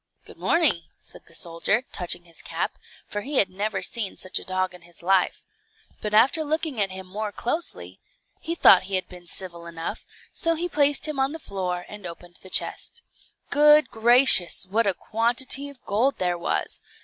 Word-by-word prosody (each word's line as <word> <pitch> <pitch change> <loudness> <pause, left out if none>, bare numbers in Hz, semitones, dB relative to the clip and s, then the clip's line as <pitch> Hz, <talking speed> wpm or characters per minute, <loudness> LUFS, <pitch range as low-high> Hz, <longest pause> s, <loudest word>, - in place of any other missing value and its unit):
"Good - - -15
morning," 310 - +2
said - - -16
the 165 - -15
soldier, 170 +9 0
touching 175 0 -1
his 170 -1 -14
cap, - - -4 0.3
for 205 - -4
he 280 +6 -5
had 190 -5 +3
never 205 +2 -3
seen 220 -5 -1
such 185 - -2
a - - -10
dog 185 0 -2
in 180 - -12
his 175 0 -13
life. 190 0 +1 0.6
But 210 0 -2
after 275 +8 +4
looking 310 -5 -2
at 195 - 0
him 190 0 -8
more 210 +3 -5
closely, 310 +11 -3 0.4
he 335 - -4
thought 190 - +6
he 195 - 0
had 185 - -2
been 180 -1 -14
civil 170 -1 -3
enough, 165 -1 -6 0.3
so 330 0 0
he 345 +2 -2
placed 290 -2 +1
him 300 -3 -4
on 270 +2 +1
the - - -5
floor, 180 - -4
and 205 -3 -9
opened 175 +1 -12
the 190 - -13
chest. 470 - -3 0.5
Good 300 -1 +5
gracious, 235 -5 +6
what 215 +4 0
a 195 - +1
quantity 245 +5 +1
of 280 -3 -16
gold 240 +7 0
there 180 -1 -1
was! 170 - -3
205 Hz, 185 wpm, -24 LUFS, 180-275 Hz, 0.6 s, thought